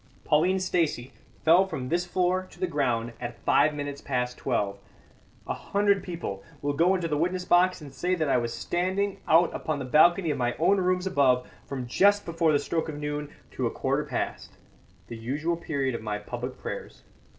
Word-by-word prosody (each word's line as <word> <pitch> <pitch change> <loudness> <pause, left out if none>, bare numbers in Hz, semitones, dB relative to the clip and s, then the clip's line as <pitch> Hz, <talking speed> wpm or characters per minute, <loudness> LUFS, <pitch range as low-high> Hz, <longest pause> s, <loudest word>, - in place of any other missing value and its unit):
Pauline 180 +5 +3
Stacey 165 -9 0 0.3
fell 175 +4 +6
from 130 -9 -4
this 175 +1 0
floor 185 +1 0
to - - -17
the 185 - +1
ground 125 -8 -1
at 120 - -5
five 150 0 +4
minutes 145 -1 -5
past 125 -2 -2
twelve. 100 -6 -1 0.7
A - - -2
hundred 200 -1 +1
people 165 - -5 0.2
will 145 0 0
go 175 +6 +3
into 180 -3 -1
the 150 -2 -1
witness 180 +2 -1
box 180 0 +3
and 140 -3 -10
say 180 +7 0
that 160 -3 -1
I 135 - +3
was 120 -1 -1
standing 190 +6 -1
out 165 +2 +5
upon 155 -2 -2
the 135 - -4
balcony 165 +5 +4
of 145 - -3
my 120 0 0
own 195 +5 +3
rooms 180 0 +1
above 130 -9 +2 0.2
from 130 -3 -4
just 205 +11 +3
before 165 -1 +1
the 145 - +4
stroke 160 +3 -2
of 150 - -5
noon 150 0 -4 0.2
to - - -1
a - - -1
quarter - - -1
past - - -4 0.5
the 115 - -8
usual 145 +9 -2
period 140 -6 -2
of 115 - -4
my 105 -1 -3
public 120 +4 -6
prayers. - - -7
155 Hz, 195 wpm, -27 LUFS, 130-180 Hz, 0.7 s, fell